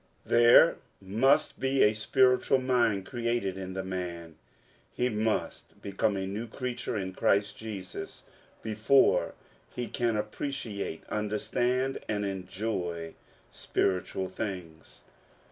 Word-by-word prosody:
There 120 +7 +6 0.2
must 120 +10 +2
be 135 0 +2
a 105 - +5
spiritual 125 +4 +3
mind 120 -6 +1
created 115 -5 -1
in 95 -1 -6
the 95 0 -3
man; 85 -3 -5 0.6
he 125 0 0
must 110 -1 -2
become 100 +1 -1
a 95 - -2
new 105 +5 -4
creature 120 -1 -4
in 95 -2 -4
Christ 100 +2 +1
Jesus 100 -5 -7 0.4
before 110 +5 +3 0.4
he 125 - -2
can 115 -3 0
appreciate, 105 - -4
understand, 120 +5 -1
and 105 -1 -1
en 95 -2 -4
joy 90 -5 -3 0.4
spiritual 95 0 -1
things. 90 -5 -7
105 Hz, 110 wpm, -29 LUFS, 95-120 Hz, 0.6 s, There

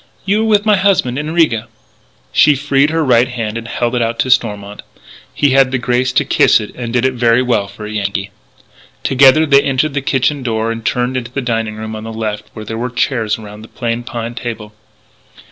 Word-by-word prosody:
"You 200 +2 +1
were 220 - 0
with 210 -1 +3
my 210 -2 +4
husband 185 -10 +1
in 150 +1 -4
Riga." 155 -10 +1 0.6
She 150 - +5
freed 140 +1 +1
her 160 0 0
right 120 -1 +4
hand 115 -3 -4
and 115 0 -5
held 120 0 -2
it 125 - 0
out 115 0 -1
to 130 - 0
Stormont. 105 -4 0 0.5
He 145 -2 +1
had 135 -1 +4
the 130 - -1
grace 125 +1 0
to - - +2
kiss - - +4
it 105 - -7
and 120 -2 -6
did 125 +1 +1
it 130 - +1
very 120 0 +2
well 120 -5 0
for 105 - -10
a 105 - -6
Yankee. 100 -1 -3 0.7
Together 135 +4 +5
they 140 -2 +5
entered 140 +2 0
the 140 - -1
kitchen 135 +1 0
door 115 -2 -1
and 115 0 -6
turned 125 +2 -1
into 120 -2 -5
the 140 - -3
dining 115 -4 -2
room 110 0 -6
on 110 - -7
the 115 - -6
left, 110 -2 -4
where 110 -1 -8
were 120 +3 -3
chairs 115 -3 -1
around 105 -1 -11
the 110 - -11
plain 115 0 -3
pine 120 -1 -5
table. 115 -3 -6
120 Hz, 215 wpm, -15 LUFS, 110-135 Hz, 0.7 s, She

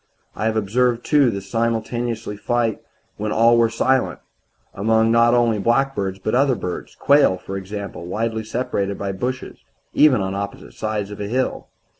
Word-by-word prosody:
I 110 - -3
have 110 0 +1
observed, 120 +3 +1
too, 145 -4 +4
the 100 -3 -3
same 105 +4 -3
simultaneous 115 0 -2
flight 115 +2 -1 0.4
when 105 0 -3
all 115 +2 +5
were 115 -1 +4
silent, 130 +3 +1 0.6
among 110 +2 +2
not 115 +1 +5
only 115 -3 +2
blackbirds, 115 -4 0
but 100 +3 -3
other 135 +1 +3
birds 90 -4 -6
quail, 140 -10 +4
for 95 +2 -7
example, 95 -2 -6
widely 110 +3 -2
separated 100 -4 -2
by 100 -1 -3
bushes 125 +7 -4 0.3
even 145 -6 +5
on 95 0 -2
opposite 100 0 -6
sides 105 -2 -3
of 105 - -7
a 100 - -3
hill. 130 +4 -2
110 Hz, 165 wpm, -21 LUFS, 100-120 Hz, 0.6 s, all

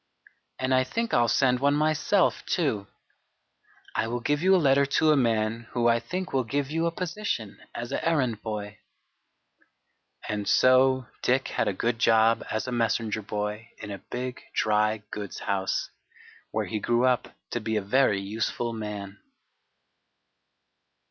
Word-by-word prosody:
And 130 0 0
I 130 0 +4
think 230 - -3
I'll 120 -1 +4
send 125 +1 +3
one 140 +2 +3
myself 155 +5 +2
too. 110 - 0 1.1
I - - 0
will 120 +2 -2
give 145 +5 0
you 190 +2 +5
a - - +6
letter 140 -4 +4
to 155 +3 +3
a - - +5
man 115 -2 0
who 120 -1 +2
I 115 0 +4
think 185 +8 -5
will 130 -1 +2
give 140 +4 -2
you 165 +1 +1
a - - 0
position 175 - -4 0.2
as 120 0 -5
an - - -1
errand 130 -10 0
boy." 105 -2 -5 1.5
And 105 -1 -2
so 130 0 +4 0.2
Dick 130 +2 +1
had - - 0
a - - +2
good 115 +4 -1
job 115 0 +4
as 110 +2 -2
a - - -3
messenger 115 -2 0
boy 105 +2 -4
in 105 - -8
a 100 - -6
big 125 +1 -5
dry 105 0 +1
goods 100 -2 -6
house, 95 -1 -1 0.6
where - - -1
he 110 - -3
grew 120 +4 +2
up 125 -1 0 0.2
to 120 - -1
be 110 0 -2
a 105 - +1
very 105 -1 +3
useful 110 +4 -2
man. 105 -2 -6
120 Hz, 160 wpm, -27 LUFS, 110-135 Hz, 1.5 s, a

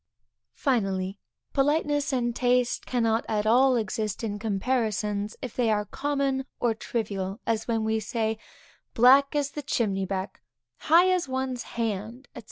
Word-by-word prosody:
Finally, 195 -6 -1 0.3
politeness 290 0 +1
and 240 -3 0
taste 250 -1 +1
cannot 230 -2 +1
at 210 -1 0
all 255 +4 +5
exist 215 -1 -2
in 205 -2 -3
comparisons, 210 -1 -1
if 250 - -6
they 240 -3 +1
are 210 -1 +1
common 275 +2 -1
or 235 -2 +2
trivial, 200 -3 -3
as 225 -1 -1
when 225 -2 0
we 220 0 +1
say, 220 0 -2 0.6
black 270 +4 +6
as 290 -1 0
the 295 - -5
chimney 200 -8 0
back, 190 0 -4 0.4
high 345 +4 +5
as 360 -6 0
one's 260 -1 -2 0.2
hand, 225 +3 -3
&c. - - -6
230 Hz, 145 wpm, -26 LUFS, 210-265 Hz, 0.6 s, black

